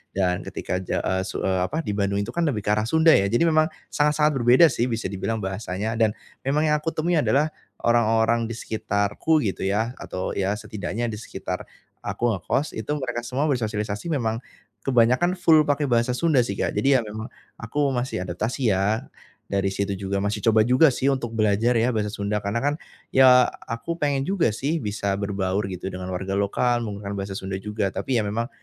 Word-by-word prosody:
Dan 90 -2 0
ketika 90 - -3
ja 95 - -2
eee, 95 0 0
su - - -4
eee, 95 -1 +1
apa 160 +8 -3
di 105 - -2
Bandung 100 0 0
itu 115 - -6
kan, 170 - -1
lebih 110 -8 -1
ke 105 - 0
arah 105 +1 +1
Sunda 160 +4 +5
ya. 100 -8 +4
Jadi 120 +9 +2
memang 155 -1 +4 0.2
sangat-sangat 150 +1 +3
berbeda 125 +7 +6
sih, 120 -1 0
bisa 115 -5 -3
dibilang 105 +2 -3
bahasanya. 100 +3 -3
Dan 110 -1 +2 0.3
memang 145 +3 +2
yang 150 - +3
aku 155 +2 -2
temui 165 +1 +1
adalah 150 +1 +2 0.3
orang-orang 115 0 +3
di 115 - -5
sekitarku 110 +7 0
gitu 95 -2 -2
ya, 110 +4 0
atau 95 0 -4
ya 100 +1 0
setidaknya 110 +1 -4
di 105 - -6
sekitar - - -6 0.3
aku 120 0 -1
ngekos, 135 - -1
itu 110 - -8
mereka 125 -4 -3
semua 130 +5 -2
bersosialisasi 110 -2 -2
memang 115 -7 -1 0.4
kebanyakan 130 +8 +3
full 160 -3 +5
pakai 145 0 +1
bahasa 120 -2 +2
Sunda 155 -5 +3
sih, 100 -4 -3
Kak. - - -1
Jadi 135 +6 +3
ya - - +2
memang, 110 +1 -6 0.3
aku 140 +4 0
masih 120 -7 -2
adaptasi 110 +6 -1
ya. 100 +4 0 0.5
Dari 100 0 +1
situ 100 +1 -1
juga 100 0 -2
masih 105 +1 -1
coba 110 -1 +5
juga 130 +7 +5
sih, 135 +1 +1
untuk 120 -4 -4
belajar 110 +3 +2
ya 120 +2 +2
bahasa 105 -1 -1
Sunda. 100 0 -2
Karena 100 +2 -2
kan, 145 - +2 0.4
ya, 130 -1 +7 0.2
aku 115 +8 -3
pengen 140 -2 +1
juga 190 -5 +1
sih 145 +9 -2
bisa 100 -2 -2
berbaur 100 -1 -1
gitu 95 +1 -5
dengan 90 0 -5
warga 95 +1 -3
lokal 120 +5 +1
menggunakan 100 -2 -5
bahasa 95 -1 -4
Sunda 95 0 -5
juga, 105 -1 -2
tapi 130 - -1
ya 110 - +1
memang 115 +4 -2
115 Hz, 195 wpm, -24 LUFS, 100-130 Hz, 0.5 s, ya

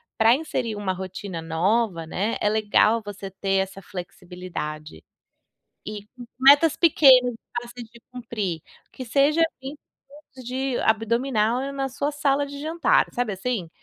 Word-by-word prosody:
pra 225 +2 +5
inserir 255 -7 -3
uma 205 -2 -2
rotina 185 -1 -6
nova 170 +3 0
né, 200 +7 -2
é - - 0
legal 215 +1 +2
você 205 -1 -8
ter 195 +1 -2
essa 195 0 -10
flexibilidade. 175 - -8 0.9
E 210 -1 -6 0.2
u 245 - -9
metas 285 +4 +6
pequenas 265 -7 +5
e 225 - -12 0.2
fáceis 240 -1 -10
de 235 +1 -18
cumprir, 220 -9 -4 0.3
que 260 - -8
seja 280 +7 +2
assim 280 -3 -3 0.7
de 255 +1 -2
abdominal 230 +1 +1
e 275 - -4
na 270 -1 -2
sua 280 +3 -2
sala 285 -1 +1
de 280 0 -9
jantar, 320 +3 +2
sabe 245 -3 -1
assim? 190 -3 -3
230 Hz, 145 wpm, -24 LUFS, 195-265 Hz, 0.9 s, metas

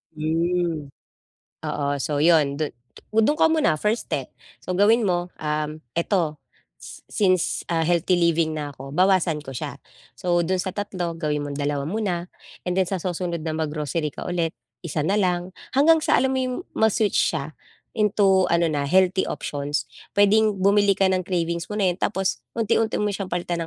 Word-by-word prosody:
Hmm. 165 -1 -1 0.7
Oo, 145 -1 -3
so 150 +2 -1
'yon, 155 -4 +4
dun 155 0 -2 0.4
dun 225 +7 +3
ka 320 - +4
muna, 305 - +2
first 210 +8 -1
step. - - -3 0.3
So 185 - -2
gawin 215 +5 +4
mo, 175 -2 0
um, 150 0 -3
eto 170 -3 0 0.4
s - - -11
since, 185 -4 +2 0.2
ah, 165 -1 +1
healthy 175 +2 +2
living 165 -2 +2
na 145 -1 -4
ko, 135 0 -10
bawasan 180 -4 +2
ko 135 - -7
siya. 125 - -5 0.4
So 175 +5 +1
do'n 180 +2 0
sa 185 - -4
3, 185 -4 -3
gawin 150 -2 -1
mong 145 0 -5
2 145 -1 -1
muna 180 0 -2 0.3
and 180 +1 -1
then 185 - +1
sa 195 - -1
susunod 175 -2 -3
na 160 - -2
mag-grocery 155 0 -2
ka - - -6
ulit, 170 -2 -1 0.3
1 160 -3 -2
na 200 +6 +2
lang, 180 -1 0 0.2
hanggang 320 +4 +6
sa - - +3
alam 265 +1 +2
mo 265 - 0
'yong 255 -1 -1 0.2
ma-switch 220 -2 +2 0.2
siya, 155 0 -4 0.5
into 200 -3 +3
ano 170 -1 +2
na 145 -1 -1
healthy 190 +2 +3
options. 145 0 -3 0.3
Puwedeng 210 +1 +4
bumili 200 0 +4
ka 195 -1 +3
ng 185 -1 -1
cravings 170 -2 -1
mo 210 - -5
na 195 -3 +3
'yun 175 - -12
tapos, 195 -2 0 0.2
unti-unti 225 0 +1
mo 210 0 0
siyang 195 -1 -4
palitan 175 -1 -2
175 Hz, 175 wpm, -24 LUFS, 155-200 Hz, 0.7 s, hanggang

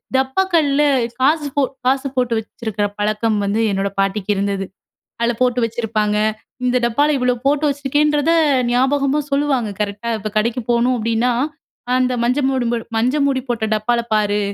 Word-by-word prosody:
டப்பாக்கள்ல 290 +1 +2 0.4
காசு 295 +2 +3
போ 285 - +3 0.2
காசு 270 +2 +1
போட்டு 245 -2 +1
வச்சிருக்குற 215 -1 -4
பழக்கம் 215 +1 0
வந்து 210 +3 0
என்னோட 195 0 -1
பாட்டிக்கு 195 +1 -1
இருந்தது. 195 0 -1 0.5
அதுல 235 0 +1
போட்டு 250 -1 +2
வச்சுருப்பாங்க. 215 -2 -1 0.5
இந்த 250 0 +2
டப்பால 285 +6 +2
இவ்ளோ 250 -1 +1
போட்டு 290 +1 +2
வச்சுருக்கேன்றத 290 +2 +1 0.4
நியாபகமா 275 +3 +2
சொல்லுவாங்க 275 -5 +1
கரெக்ட்‌டா. 210 +3 -3
இப்போ 215 - -4
கடைக்கு 235 +3 0
போணும் 240 +1 +2
அப்டின்னா, 230 +2 0 0.6
"அந்த 255 0 +1
மஞ்ச 250 +4 +1
மூடி 260 -2 0 0.3
மஞ்ச 250 +5 +1
மூடி 265 -2 0
போட்ட 230 -2 -1
டப்பால 235 +3 0
பாரு, 210 -1 +1
245 Hz, 140 wpm, -19 LUFS, 215-275 Hz, 0.6 s, காசு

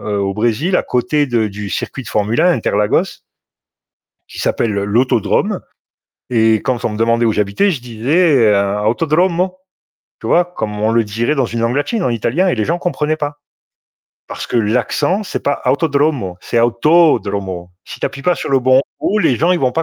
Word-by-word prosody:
heu, 105 -1 -3
au 100 0 -1
Brésil, 120 - 0
à - - +1
côté 145 +4 0
de 115 -3 0
du 100 0 -7
circuit 130 - -4
de - - -9
formule 105 +2 0
1 180 - +4
Interlagos 105 -5 0 1.1
qui - - -11
s'appelle 115 - 0
l'autodrome 105 +3 0 0.7
et 110 -2 +3
quand 120 +2 -3
on - - 0
me 105 - -5
demandait 115 +1 +2
où 110 - +2
j'habitais, 105 - +1
je 145 -8 -3
disais, 135 +8 +1 0.2
heu, 100 +1 +1
Autodromo, 170 - +1 0.6
tu - - -6
vois? 175 - +4
Comme 110 -12 -5
on 110 +1 +1
le 115 0 +3
dirait 115 +8 -1
dans 135 -3 +1
une 115 0 -4
langue 115 +2 0
latine, 205 +8 -1
en - - +1
italien 120 - 0
et - - 0
les 110 - -1
gens 170 +2 0
comprenaient 155 -3 -1
pas. 145 -1 -4 0.9
Parce - - -6
que - - -2
l'accent, 115 - 0
c'est - - -4
pas 140 0 -1
Autodromo 140 - 0
c'est 115 - 0
Autodromo. 110 - +1
Si - - -10
tu - - 0
appuies 140 - -8
pas 180 +4 +2
sur - - -5
le 135 -1 +3
bon 130 +1 +4 0.2
O, 210 - 0
les 160 -9 +2
gens, 165 +8 +1
ils 180 - +2
vont 130 -3 +1
pas 165 - 0
120 Hz, 195 wpm, -16 LUFS, 110-155 Hz, 1.1 s, 1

